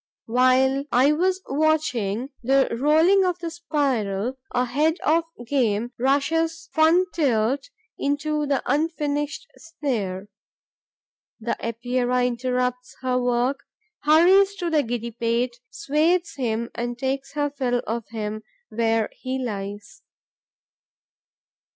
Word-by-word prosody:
While 255 +3 +3
I 255 +4 +5
am 300 +2 +1 0.3
watching 270 -6 0
the 265 0 +2
rolling 320 +8 +4
of 360 -2 0
the 340 -2 -5
spiral, 265 - -1
a 250 0 0
head 305 +7 +1
of 325 +2 +2 0.2
game 235 -3 0
rushes 320 +5 0
fun 325 +3 +4
tilt 265 - +1 0.3
into 295 +1 -1
the 275 -1 0
unfinished 295 - -1
snare. 225 - -4 1.1
The 230 +1 -2
Epeira 245 +2 0
interrupts 250 0 -2
her 255 -1 0
work, 245 +2 +1 0.4
hurries 370 +6 +5
to 350 -3 -3
the 310 -2 +4
giddy 235 -2 -4
pate, 235 +2 -1
swathes 335 +5 +1
him 235 -3 -2
and 240 0 -4
takes 270 +2 -3
her 290 -1 -1
fill 250 -4 -1
of 230 -1 -3
him 215 0 -4 0.3
where 225 -1 +1
he 260 0 -4
lies. 205 - -6
265 Hz, 115 wpm, -24 LUFS, 235-305 Hz, 1.1 s, I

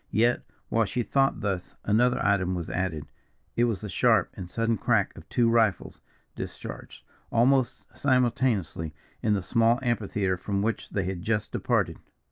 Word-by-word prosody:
Yet, 120 +3 +2 0.3
while 115 -1 +2
she 125 +3 -2
thought 135 +3 +1
thus, 95 -3 -3
another 120 +4 +3
item 95 -3 +2
was 85 -2 -4
added 80 -5 -2 0.5
it 120 - +3
was 115 -6 -1
the 105 - -5
sharp - - +3
and 90 -2 -8
sudden 115 +3 0
crack - - +1
of - - -13
two 120 -1 +3
rifles, 115 -5 +1 0.3
discharged, - - -8 0.3
almost 125 +2 +2
simultaneously, 120 - +1 0.3
in 110 -3 +2
the 95 - -2
small 115 +3 +3
amphitheatre 105 -5 0
from 100 +2 -2
which 115 +1 -2
they 95 - -1
had 90 -1 -3
just 110 +2 -1
departed. - - 0
110 Hz, 155 wpm, -27 LUFS, 95-120 Hz, 0.5 s, another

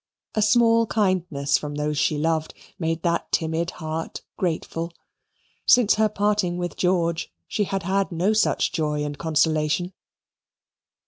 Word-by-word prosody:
A 215 - +1
small 230 +1 +4
kindness 180 -10 +1
from 145 -1 -6
those 150 0 -1
she 150 +1 +1
loved 160 +1 -1 0.2
made 165 -1 -2
that 170 -1 0
timid 160 +1 0
heart 160 0 -5
grateful. 165 -1 -2 0.8
Since 240 -4 +6
her 215 0 +2
parting 205 -4 0
with 175 0 -3
George 170 -2 0 0.2
she 205 - 0
had 195 0 -3
had 195 +2 0
no 180 +5 +1
such 215 - +2
joy 150 -3 -1
and 145 0 -4
consolation. 155 +2 +1
170 Hz, 135 wpm, -24 LUFS, 160-195 Hz, 0.8 s, Since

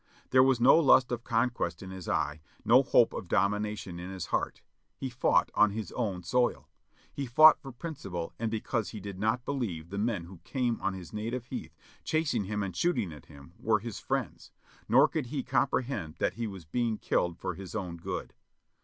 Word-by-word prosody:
There 130 - +7
was 130 -2 +4
no 130 +7 +7
lust 130 -5 +5
of 120 -1 -2
conquest 115 -9 -1
in 95 - -8
his 95 -2 -7
eye, 75 +1 -1 0.2
no - - +7
hope - - +4
of - - -5
domination 105 -2 0
in 90 +1 -6
his 95 -2 -5
heart; - - -1 0.3
he 130 - -4
fought 120 - +2
on 105 - +5
his 105 -2 -5
own 100 -7 -2
soil 125 +7 +1 0.2
— - - -32
he 140 -2 -4
fought 155 +6 +7
for 135 -3 -8
principle 110 - -6
and 115 -1 -1
because 110 0 -2
he 110 - -7
did 100 -1 -7
not 110 +4 0
believe 95 - -3
the 100 - -3
men 105 -5 0
who 90 +1 -12
came 125 -3 -1
on 100 - -1
his 90 0 -10
"native 115 +3 -3
heath," - - -7 0.3
chasing 155 -10 0
him 105 +1 -2
and 95 -3 -5
shooting 110 - 0
at 75 - -13
him, 70 +2 -14
were 110 -2 +2
his 110 0 -6
friends, - - -3 0.4
nor - - +7
could 150 -6 -3
he 135 +1 -3
compre 135 - +1
hend 100 - -5
that - - 0
he 115 +3 -3
was 95 -5 -8
being 115 +6 -1
killed 85 -4 0
for 90 - -3
his 95 +3 -9
own 90 -5 -4
good. 85 - -5
105 Hz, 205 wpm, -30 LUFS, 90-125 Hz, 0.4 s, There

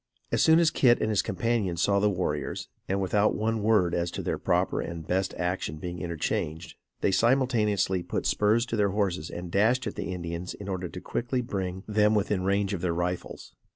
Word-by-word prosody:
As - - +2
soon 160 0 +6
as 165 -2 +4
Kit 120 -3 +4
and 110 - 0
his 105 - +3
companions 100 -4 -1
saw 100 -1 +3
the 105 +1 +3
warriors, 75 -7 -3 0.2
and 95 +1 +1
without 100 +2 +2
one 110 +1 -1
word 105 -5 +3
as 85 0 0
to - - -5
their - - -2
proper - - +1
and 85 -2 -6
best 95 +3 -1
action 90 -4 -2
being 90 +2 -6
interchanged, 85 -1 -3 0.3
they - - +2
simultaneously 110 -6 +2
put - - -3
spurs 110 +3 +2
to 125 - -3
their 105 -2 +2
horses 95 -5 -1
and 85 0 -7
dashed 115 +7 +2
at 105 - -3
the - - -4
Indians 85 0 -5
in 100 - -9
order 90 -2 -3
quickly 125 +1 -2
to - - -12
bring 95 -2 -3
them 105 0 +3
within 100 -2 0
range 100 +1 +1
of 90 - -3
their 85 -2 0
rifles. 90 +1 -4
95 Hz, 200 wpm, -27 LUFS, 90-110 Hz, 0.3 s, soon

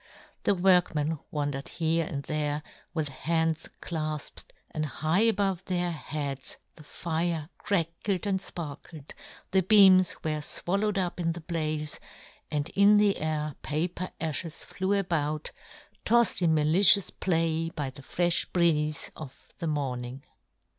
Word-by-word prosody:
The 200 - +3
workmen 175 -4 +2
wandered 145 -2 -3
here 165 -1 0
and 140 -1 -4
there, 150 0 -2 0.3
with 155 -4 -2
hands 160 +2 -1
clafped, 155 -3 -4 0.3
and 155 - -2
high 155 +5 0
above 200 -5 +2
•their 175 -1 -1
heads 145 -3 -5 0.2
the 155 - -14
fire 160 +1 -2
crackled 185 0 -1
and 195 -2 +1
fparkled, 155 -4 -7 0.4
the 190 0 +4
beams 190 -2 +7
were 155 -1 -1
fwallowed 195 +7 -1
up 180 -2 -1
in 165 -1 0
the 170 - -8
blaze, 155 -2 -3 0.5
and 150 +1 -2
in 200 +1 +5
the 205 -1 +3
air 155 -1 -2
paper 175 +4 -2
afhes 160 +1 -3
flew 190 +1 -1
about, 155 -6 -1 0.5
tofled 235 -4 +3
in 165 -2 +3
malicious 175 +6 +5
play 165 -2 0
by 145 -5 -4
the 140 - -13
frelh 175 +5 +1
breeze 155 -3 +1
of 145 -5 -11
the 170 - -3
morn 135 -5 -2
ing. 130 +3 -8
165 Hz, 135 wpm, -28 LUFS, 150-185 Hz, 0.5 s, beams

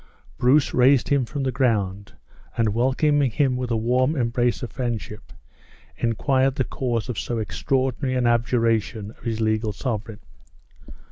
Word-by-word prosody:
Bruce 135 +4 +3
raised 130 0 +4
him 140 -3 +2
from 140 +3 -4
the 130 - 0
ground, 100 -6 -1 0.4
and 110 -3 +1
welcoming 135 +4 +2
him 135 +1 +1
with 125 -1 -3
the 115 - +1
warm 125 +6 +1
embrace 120 -1 0
of 120 - -5
friendship, 115 -4 -5 0.6
inquired 130 +3 +1
the 130 - +1
cause 120 -2 -2
of 125 - -3
so 120 - -3
extraordinary 130 - -1
an 125 -1 +1
abjuration 115 -3 +1
of - - -21
his 115 -1 -3
legal 110 0 0
sovereign. 110 -2 -4
120 Hz, 145 wpm, -23 LUFS, 110-130 Hz, 0.6 s, raised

